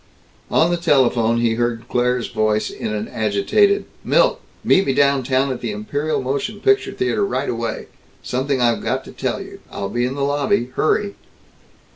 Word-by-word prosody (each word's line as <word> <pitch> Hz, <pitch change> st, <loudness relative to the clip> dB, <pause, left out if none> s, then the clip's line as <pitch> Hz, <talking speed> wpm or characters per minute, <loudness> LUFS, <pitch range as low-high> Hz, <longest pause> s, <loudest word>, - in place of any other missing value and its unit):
On 165 Hz, +2 st, +3 dB
the 175 Hz, -, +1 dB
telephone, 120 Hz, -8 st, +2 dB
he 115 Hz, -1 st, +2 dB
heard 120 Hz, 0 st, -2 dB
Claire's 125 Hz, 0 st, 0 dB
voice 110 Hz, -1 st, 0 dB
in -, -, -5 dB
an 105 Hz, 0 st, -3 dB
agitated, 110 Hz, -, +2 dB, 0.2 s
"Milt! -, -, +2 dB, 0.2 s
Meet 190 Hz, -, +3 dB
me 135 Hz, -, +2 dB
down 140 Hz, -1 st, +3 dB
town, 130 Hz, +1 st, +1 dB
at 125 Hz, -, -5 dB
the 120 Hz, -, -3 dB
Imperial 140 Hz, +9 st, -2 dB
Motion 140 Hz, +11 st, -2 dB
Picture 405 Hz, -, +2 dB
Theater, 370 Hz, -, 0 dB
right 145 Hz, -8 st, -1 dB
away. 115 Hz, -1 st, -3 dB, 0.4 s
Something 130 Hz, +2 st, -1 dB
I've 120 Hz, -2 st, +2 dB
got -, -, -1 dB
to -, -, -10 dB
tell -, -, -3 dB
you. -, -, -10 dB
I'll 100 Hz, -, -4 dB
be 120 Hz, +4 st, 0 dB
in 130 Hz, -, -4 dB
the 140 Hz, -, -2 dB
lobby. 140 Hz, -3 st, 0 dB
Hurry!" 200 Hz, +5 st, +1 dB
130 Hz, 175 wpm, -20 LUFS, 115-145 Hz, 0.4 s, On